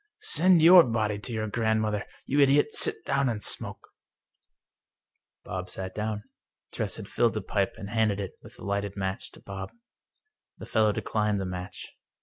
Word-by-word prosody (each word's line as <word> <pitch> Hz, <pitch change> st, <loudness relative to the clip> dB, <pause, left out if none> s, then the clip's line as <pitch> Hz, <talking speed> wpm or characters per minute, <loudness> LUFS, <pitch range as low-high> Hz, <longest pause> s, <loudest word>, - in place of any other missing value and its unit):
" 430 Hz, -, -63 dB
Send 180 Hz, -3 st, +5 dB
your 175 Hz, +1 st, +9 dB
body 110 Hz, -4 st, -1 dB
to 115 Hz, -, -7 dB
your 110 Hz, -1 st, -2 dB
grandmother! 110 Hz, -1 st, -1 dB, 0.2 s
You 140 Hz, -, 0 dB
idiot, 145 Hz, +1 st, +4 dB
sit -, -, +4 dB
down 140 Hz, -1 st, +1 dB
and 105 Hz, -3 st, -4 dB
smoke! -, -, -1 dB, 0.8 s
" -, -, -60 dB
Bob 90 Hz, -1 st, -5 dB
sat 95 Hz, 0 st, -6 dB
down. 105 Hz, -1 st, -3 dB, 0.5 s
Tress -, -, -2 dB
had -, -, -8 dB
filled 115 Hz, -2 st, +1 dB
the 110 Hz, -, -2 dB
pipe, 100 Hz, 0 st, -1 dB
and 100 Hz, 0 st, -8 dB
handed 110 Hz, -3 st, +1 dB
it, 100 Hz, -2 st, -4 dB
with -, -, -14 dB
a -, -, -13 dB
lighted 100 Hz, 0 st, -3 dB
match, 95 Hz, -1 st, -3 dB
to -, -, -13 dB
Bob. 95 Hz, -1 st, -7 dB, 0.9 s
The -, -, -9 dB
fellow 110 Hz, -1 st, +2 dB
declined 105 Hz, -1 st, -1 dB
the 95 Hz, -, -3 dB
match. 90 Hz, 0 st, -6 dB
105 Hz, 175 wpm, -27 LUFS, 100-115 Hz, 0.9 s, your